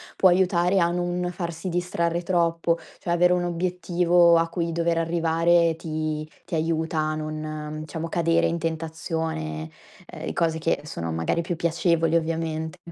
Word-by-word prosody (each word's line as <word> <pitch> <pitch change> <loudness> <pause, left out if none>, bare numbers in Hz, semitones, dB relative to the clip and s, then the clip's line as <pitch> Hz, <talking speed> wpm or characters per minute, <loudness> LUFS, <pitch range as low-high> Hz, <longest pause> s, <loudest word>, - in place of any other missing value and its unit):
può 190 - +5
aiutare 180 +1 +3
a 170 -1 +3
non 175 0 -1
farsi 170 0 -5
distrarre 170 -1 -1
troppo. 170 -1 +1 0.2
Cioè 170 - -3
avere 180 +1 +4
un 180 0 +1
obiettivo 175 0 +3
a 165 0 +2
cui 170 0 -2
dover 170 0 0
arrivare 165 0 -1 0.5
ti 155 -1 -3 0.2
ti - - -11
aiuta 160 0 0
a 155 0 0
non, 155 0 -5
diciamo, 165 +2 -5
cadere 165 0 +2
in 170 - 0
tentazione, 160 - -3 0.4
ehm, - - -8
e - - -4
cose 165 -1 0
che 160 -2 0
sono 85 - -5
magari 80 - 0
più 170 +1 -3
piacevoli 165 0 +1
ovviamente. 160 0 -1
165 Hz, 155 wpm, -25 LUFS, 160-175 Hz, 0.5 s, può